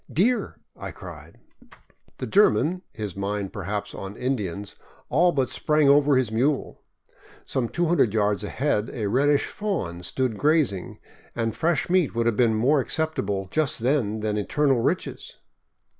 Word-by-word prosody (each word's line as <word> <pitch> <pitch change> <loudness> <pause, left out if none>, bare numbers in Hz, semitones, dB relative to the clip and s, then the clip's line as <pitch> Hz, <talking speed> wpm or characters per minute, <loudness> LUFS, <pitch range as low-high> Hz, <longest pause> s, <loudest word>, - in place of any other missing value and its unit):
"Deer!" 235 +9 +1 0.2
I - - -7
cried. - - -11 0.8
The - - -4
German, 180 - +3
his 105 - -6
mind 100 0 -3
perhaps 100 0 -4
on 95 +1 -7
Indians, 105 -7 -3 0.3
all 175 +6 +4
but 135 -5 0
sprang 150 -2 +2
over 145 0 +5
his 125 -4 0
mule. 135 +6 0 0.6
Some 120 -3 -1
two 175 - 0
hundred 165 -10 +3
yards 105 -1 +1
ahead 115 0 -1
a 115 -5 -3
reddish 140 +7 +2
fawn 165 - -3
stood 115 +4 -2
grazing, 145 - +1 0.4
and 115 -2 -1
fresh 165 -3 0
meat 175 -8 +2
would 115 0 +1
have 115 -2 +2
been 115 -1 +3
more 135 +7 +3
acceptable 110 -10 -2
just 150 -6 0
then 115 -5 0
than 105 -1 -1
eternal 135 +5 +1
riches. - - -2
125 Hz, 145 wpm, -25 LUFS, 105-150 Hz, 0.8 s, over